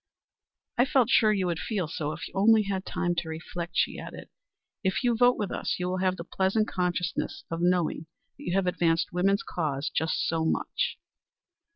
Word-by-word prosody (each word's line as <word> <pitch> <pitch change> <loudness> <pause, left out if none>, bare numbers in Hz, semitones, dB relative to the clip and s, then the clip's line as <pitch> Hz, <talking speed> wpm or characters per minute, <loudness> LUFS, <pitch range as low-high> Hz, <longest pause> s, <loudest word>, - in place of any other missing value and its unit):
"I 245 - +6
felt 260 -4 +3
sure 215 -2 +5
you 195 -3 +1
would 170 -2 -1
feel 200 -7 -2
so 150 -1 -3
if 160 +1 -6
you - - -16
only 215 +2 +5
had 195 -1 -3
time 175 -1 0
to 170 -1 -2
reflect," 170 +2 -6
she - - +1
added. - - -9 0.5
"If 190 +6 0
you 240 -1 +3
vote 245 +2 +4
with 205 -3 -2
us, - - -1
you 180 - -2
will 185 0 -1
have 185 0 +1
the 170 - -5
pleasant 195 +5 +1
consciousness 180 -1 -2
of 165 0 -2
knowing 175 -3 +1 0.3
that - - -13
you 175 - -2
have 195 -1 +2
advanced 170 -2 +1
woman's 195 +3 +2
cause 150 -4 -2
just 160 0 0
so 165 -1 0
much." 160 - -1
180 Hz, 195 wpm, -28 LUFS, 165-200 Hz, 0.5 s, I